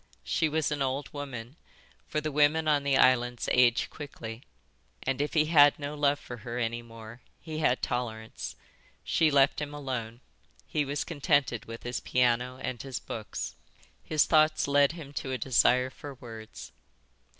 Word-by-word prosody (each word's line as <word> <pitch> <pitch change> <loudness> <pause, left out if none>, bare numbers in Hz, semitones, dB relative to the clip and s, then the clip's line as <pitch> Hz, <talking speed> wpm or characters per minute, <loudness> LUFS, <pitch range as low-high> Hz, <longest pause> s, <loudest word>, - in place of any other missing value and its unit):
She 110 - +1
was 155 0 0
an 145 -1 -2
old 135 +2 -2
woman, 135 -2 -7 0.5
for 155 - -1
the 155 +1 -3
women 150 +2 +3
on 150 -2 +3
the 140 -1 +2
islands 125 -2 +3
age 120 -2 +4
quickly, 115 -6 -8 0.6
and 135 +1 -1
if 150 - -2
he 155 -1 +4
had 145 -2 +6
no 145 0 -5
love 145 -1 +2
for 125 - -9
her 120 +1 -6
any 120 0 -1
more 115 0 -12 0.2
he 155 -1 -6
had 130 -5 +1
tolerance. 115 -3 -4 0.5
She 160 - +3
left 140 +1 +3
him 145 0 -5
alone. 125 -5 -5 0.4
He 145 - -1
was 145 +1 -2
contented 145 -7 +1
with 115 0 -9
his 120 0 -3
piano 125 0 +1
and 125 - -3
his 135 -2 -5
books. 110 -2 -5 0.5
His 155 -1 +2
thoughts 155 -2 +3
led 140 +1 +4
him 150 -4 -10
to 130 -2 -3
a - - 0
desire 125 0 +3
for 140 +1 -9
words. 110 -3 -10
135 Hz, 165 wpm, -29 LUFS, 120-145 Hz, 0.6 s, had